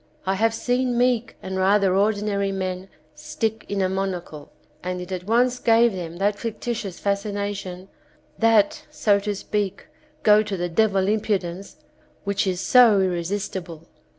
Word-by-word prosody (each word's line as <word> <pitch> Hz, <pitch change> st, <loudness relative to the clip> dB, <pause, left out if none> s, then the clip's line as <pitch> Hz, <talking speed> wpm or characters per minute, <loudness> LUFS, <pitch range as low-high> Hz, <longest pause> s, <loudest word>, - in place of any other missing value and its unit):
I 190 Hz, -, +1 dB
have 225 Hz, +3 st, +1 dB
seen 245 Hz, +1 st, 0 dB
meek 245 Hz, -1 st, +1 dB
and 190 Hz, 0 st, -4 dB
rather 195 Hz, 0 st, +3 dB
ordinary 200 Hz, -1 st, +1 dB
men 185 Hz, 0 st, -4 dB, 0.2 s
stick 220 Hz, 0 st, -4 dB
in 200 Hz, -1 st, 0 dB
a -, -, +2 dB
monocle, 185 Hz, -6 st, -4 dB, 0.3 s
and 180 Hz, 0 st, -4 dB
it 180 Hz, +1 st, -8 dB
at 180 Hz, -1 st, -4 dB
once 245 Hz, +3 st, +2 dB
gave 230 Hz, 0 st, +4 dB
them 170 Hz, -2 st, -6 dB
that 205 Hz, +2 st, 0 dB
fictitious 225 Hz, -4 st, -4 dB
fascination, 200 Hz, -2 st, -3 dB, 0.5 s
that, 225 Hz, -3 st, +3 dB
so 205 Hz, -2 st, +2 dB
to 205 Hz, 0 st, -3 dB
speak, 200 Hz, 0 st, -3 dB, 0.4 s
go 210 Hz, 0 st, +6 dB
to 210 Hz, -2 st, -4 dB
the 175 Hz, 0 st, -2 dB
devil 195 Hz, +1 st, +2 dB
impudence 200 Hz, -3 st, -2 dB, 0.5 s
which 200 Hz, 0 st, 0 dB
is 180 Hz, -1 st, -1 dB
so 240 Hz, -5 st, +6 dB
irresistible. 180 Hz, -2 st, -3 dB
200 Hz, 145 wpm, -23 LUFS, 185-215 Hz, 0.5 s, go